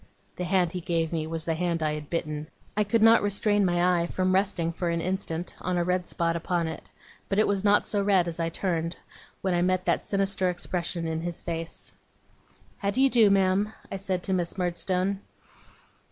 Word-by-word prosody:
The 180 Hz, -, -3 dB
hand 180 Hz, -2 st, +2 dB
he 180 Hz, -1 st, -4 dB
gave 165 Hz, -1 st, -1 dB
me 160 Hz, -1 st, -1 dB
was 165 Hz, 0 st, -4 dB
the 165 Hz, -, +1 dB
hand 170 Hz, 0 st, -1 dB
I 155 Hz, -1 st, +1 dB
had 150 Hz, -1 st, -6 dB
bitten. 155 Hz, -2 st, -3 dB, 0.3 s
I 210 Hz, -, +3 dB
could 215 Hz, +2 st, +2 dB
not 225 Hz, +1 st, +7 dB
restrain 205 Hz, 0 st, +2 dB
my 175 Hz, -1 st, +3 dB
eye 170 Hz, -, -1 dB
from 185 Hz, +1 st, 0 dB
resting 185 Hz, -4 st, +1 dB
for 175 Hz, 0 st, -2 dB
an 170 Hz, 0 st, 0 dB
instant 180 Hz, -1 st, -3 dB
on 180 Hz, 0 st, -1 dB
a 175 Hz, -, +2 dB
red 180 Hz, 0 st, 0 dB
spot 165 Hz, 0 st, 0 dB
upon 170 Hz, 0 st, -1 dB
it; 160 Hz, -, -7 dB, 0.4 s
but 195 Hz, -, 0 dB
it 215 Hz, -, +5 dB
was 200 Hz, -1 st, 0 dB
not 205 Hz, 0 st, +4 dB
so 205 Hz, -1 st, +1 dB
red 195 Hz, -3 st, +3 dB
as 170 Hz, 0 st, -4 dB
I 165 Hz, 0 st, 0 dB
turned, 165 Hz, -1 st, -2 dB, 0.5 s
when 190 Hz, -1 st, +1 dB
I 175 Hz, -, +2 dB
met 185 Hz, 0 st, +1 dB
that -, -, +1 dB
sinister 195 Hz, -2 st, +1 dB
expression 175 Hz, -1 st, -2 dB
in 160 Hz, 0 st, -2 dB
his 175 Hz, 0 st, -4 dB
face. 165 Hz, -1 st, -5 dB, 0.9 s
'How 200 Hz, -, 0 dB
do 205 Hz, -, -1 dB
you 270 Hz, 0 st, +5 dB
do, 225 Hz, -4 st, +6 dB
ma'am?' 195 Hz, +2 st, +2 dB, 0.2 s
I 195 Hz, -, -2 dB
said 190 Hz, -2 st, -2 dB
to 190 Hz, -, -1 dB
Miss 175 Hz, 0 st, -1 dB
Murdstone. 185 Hz, +2 st, 0 dB
180 Hz, 210 wpm, -27 LUFS, 170-195 Hz, 0.9 s, not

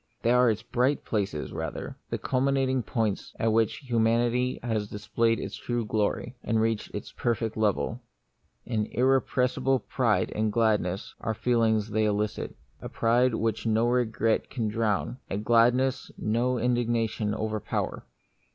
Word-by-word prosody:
They 115 Hz, -, +3 dB
are 125 Hz, 0 st, +5 dB
its 110 Hz, +1 st, -1 dB
bright 130 Hz, +4 st, 0 dB
places 100 Hz, -8 st, -2 dB
rather, -, -, -5 dB
the -, -, -1 dB
culmi 135 Hz, +1 st, +1 dB
nating 130 Hz, -4 st, 0 dB
points 110 Hz, -4 st, -1 dB
at 115 Hz, -1 st, +2 dB
which 115 Hz, +5 st, +1 dB
humanity 120 Hz, +2 st, +2 dB
has 110 Hz, -3 st, -1 dB
displayed 115 Hz, +3 st, 0 dB
its -, -, -5 dB
true 120 Hz, -2 st, -2 dB
glory, 110 Hz, +3 st, -1 dB
and 110 Hz, 0 st, +1 dB
reached 110 Hz, -1 st, 0 dB
its -, -, -6 dB
perfect 115 Hz, -2 st, -1 dB
level. 110 Hz, +2 st, 0 dB, 0.6 s
An 110 Hz, -3 st, -1 dB
irrepressible 130 Hz, 0 st, +2 dB
pride 120 Hz, -, 0 dB
and 110 Hz, 0 st, 0 dB
gladness 105 Hz, -4 st, 0 dB
are 110 Hz, -, -1 dB
the -, -, -24 dB
feelings 110 Hz, -3 st, +2 dB
they 110 Hz, +1 st, +2 dB
elicit: 105 Hz, 0 st, -1 dB, 0.3 s
a -, -, -6 dB
pride 120 Hz, +1 st, +2 dB
which 110 Hz, 0 st, -1 dB
no 110 Hz, +1 st, +3 dB
regret 115 Hz, -2 st, +1 dB
can 115 Hz, -5 st, -2 dB
drown, 110 Hz, +3 st, -1 dB
a 95 Hz, -, -2 dB
gladness 120 Hz, +4 st, +3 dB
no 120 Hz, +4 st, 0 dB
indignation 115 Hz, -3 st, 0 dB
over 110 Hz, 0 st, -2 dB
power. -, -, -3 dB
115 Hz, 150 wpm, -27 LUFS, 110-125 Hz, 0.6 s, are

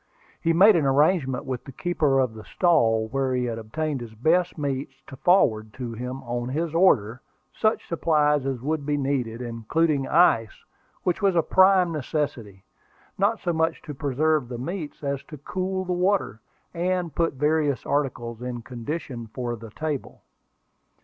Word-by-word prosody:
He 165 Hz, -, +2 dB
made 195 Hz, +5 st, +7 dB
an 155 Hz, -5 st, +2 dB
arrangement 140 Hz, -1 st, +2 dB
with 130 Hz, -2 st, -4 dB
the 135 Hz, -, -9 dB
keeper 150 Hz, -2 st, 0 dB
of 130 Hz, -4 st, +1 dB
the 110 Hz, -1 st, -10 dB
stall 115 Hz, -, +2 dB
where 135 Hz, 0 st, 0 dB
he 125 Hz, 0 st, 0 dB
had 115 Hz, -1 st, -3 dB
obtained 140 Hz, +5 st, -3 dB
his 115 Hz, -2 st, -9 dB
best 170 Hz, +10 st, +1 dB
meats 135 Hz, -2 st, -3 dB
to 135 Hz, -, -10 dB
forward 110 Hz, -, +2 dB
to 120 Hz, -3 st, -5 dB
him, 125 Hz, +3 st, -6 dB
on 120 Hz, 0 st, -3 dB
his 160 Hz, +4 st, -2 dB
order, 130 Hz, -, +3 dB, 0.3 s
such 220 Hz, 0 st, 0 dB
supplies 150 Hz, -4 st, +2 dB
as 130 Hz, -3 st, -3 dB
would 155 Hz, +1 st, -1 dB
be 145 Hz, +1 st, 0 dB
needed, 125 Hz, -4 st, -2 dB
including 135 Hz, +5 st, 0 dB
ice, 115 Hz, -10 st, +3 dB, 0.4 s
which 180 Hz, +3 st, 0 dB
was 195 Hz, -2 st, +3 dB
a 165 Hz, -, +3 dB
prime 185 Hz, -1 st, +5 dB
necessity, 135 Hz, -, -3 dB, 0.6 s
not 210 Hz, +3 st, +2 dB
so 175 Hz, -, -1 dB
much 160 Hz, 0 st, 0 dB
to 150 Hz, -, -7 dB
preserve 145 Hz, 0 st, 0 dB
the 120 Hz, -, -5 dB
meats 155 Hz, +3 st, -6 dB
as 140 Hz, -1 st, -2 dB
to 150 Hz, -, -10 dB
cool 185 Hz, +5 st, -3 dB
the 180 Hz, -, -1 dB
water, 180 Hz, -, 0 dB, 0.3 s
and 180 Hz, -1 st, -1 dB
put 165 Hz, -1 st, 0 dB
various 150 Hz, 0 st, +1 dB
articles 120 Hz, -5 st, -2 dB
in 125 Hz, -1 st, -5 dB
condition 125 Hz, 0 st, -6 dB
for 120 Hz, +2 st, -4 dB
the 115 Hz, 0 st, -10 dB
table. 150 Hz, +4 st, -5 dB
145 Hz, 165 wpm, -25 LUFS, 125-165 Hz, 0.6 s, made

